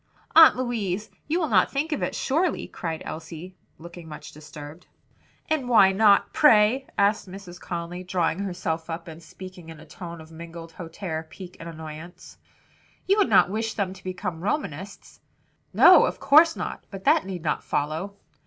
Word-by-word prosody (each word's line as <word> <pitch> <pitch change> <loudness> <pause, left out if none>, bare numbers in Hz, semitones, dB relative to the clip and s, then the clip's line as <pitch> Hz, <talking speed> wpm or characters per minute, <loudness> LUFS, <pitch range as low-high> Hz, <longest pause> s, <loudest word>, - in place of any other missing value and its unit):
"Aunt 325 0 +9
Louise, 215 -6 -3 0.2
you 325 +4 0
will 320 - 0
not 190 -5 +4
think 295 +4 -2
of 300 - -2
it - - -2
surely?" 320 +6 -1
cried 165 -2 -5
Elsie, 165 +3 -8 0.2
looking 170 0 -11
much 150 - -10
disturbed. 150 +2 -12 0.6
"And 290 -6 -1
why 195 -5 +6
not, 200 +1 +4
pray?" 250 -1 +4
asked 200 -1 +1
Mrs. 185 -1 -10
Conly, 175 +1 -5
drawing 180 -1 -1
herself 175 -4 -4
up, 165 +1 -6
and 165 0 -10
speaking 185 -1 -12
in 160 -2 -11
a 155 - -13
tone 170 +2 -9
of 160 0 -13
mingled 165 0 -10
hauteur, 165 -1 -6
pique 180 -2 -11
and 170 - -8
annoyance. 160 +2 -10 0.7
"You 395 +2 +3
would 405 - +3
not 185 - +5
wish 225 +1 -3
them 195 -3 -2
to 185 - -16
become 180 -2 -5
Romanists?" 195 - -5 0.5
"No, - - +7
of - - -5
course 325 +3 +5
not; - - -5
but 195 -2 -9
that 190 - +3
need 180 -4 -6
not 150 - -1
follow." 160 +7 -3
185 Hz, 170 wpm, -25 LUFS, 165-210 Hz, 0.7 s, Aunt